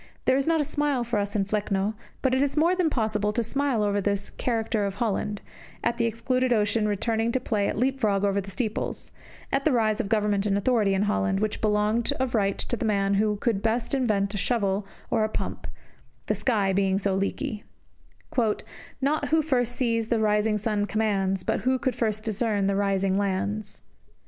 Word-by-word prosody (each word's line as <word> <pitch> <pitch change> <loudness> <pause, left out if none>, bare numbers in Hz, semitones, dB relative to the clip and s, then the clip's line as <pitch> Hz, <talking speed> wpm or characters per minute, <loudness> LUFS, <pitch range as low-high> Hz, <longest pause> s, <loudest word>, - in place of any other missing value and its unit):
There 260 - +4
is 275 +2 0
not 330 -1 +3
a - - +3
smile 290 -3 0
for 235 -2 -1
us 205 +1 -3
in 200 -2 +2
"Flecno," 205 0 -1 0.3
but 260 -1 +2
it 260 - +3
is 285 +1 0
more 335 +4 +4
than 360 -3 +2
possible 215 -5 0
to 235 - 0
smile 265 -1 0
over 205 0 +1
this 200 0 -1
"Character 225 -3 -1
of 195 -1 -3
Holland"; 210 -1 -1 0.4
at 235 +1 0
the 230 - +3
excluded 255 +3 0
ocean 210 -1 +2
returning 225 +2 0
to 260 - +2
play 215 -5 0
at - - -3
leap 265 +3 +1
frog 200 -5 +1
over 200 0 +1
the 195 - -9
steeples; 210 +3 -3 0.4
at 275 0 +1
the 310 - +3
rise 220 -3 +2
of 200 - -6
government 210 -2 +1
and 200 -1 +2
authority 210 -3 +2
in 190 - +1
Holland, 205 -2 +1
which 215 0 -2
belonged 215 +2 +2
of 260 -2 -2
right 200 -3 +1
to - - 0
the 240 - -4
man 200 -2 +1
who 210 +1 +2
could 205 -1 -1
best 225 +3 -1
invent 210 -7 +1
a 205 - -2
shovel 200 -1 0 0.2
or 220 - +2
a 215 - 0
pump, - - -4 0.6
the - - +1
country 205 -6 +1
being 195 0 +2
so 195 -1 0
leaky: 200 +2 -2 1.4
Not 290 +3 +1
who 320 0 +3
first 245 -5 0
sees 230 -3 0
the 230 - +1
rising 210 0 +2
sun 210 -1 0
commands, 195 -3 0
But - - 0
who 260 +1 +1
could 250 -1 -1
first 215 -2 -1
discern 215 -2 0
the 200 0 +1
rising 195 -1 +1
lands. 200 +1 -2
215 Hz, 200 wpm, -26 LUFS, 200-240 Hz, 1.4 s, There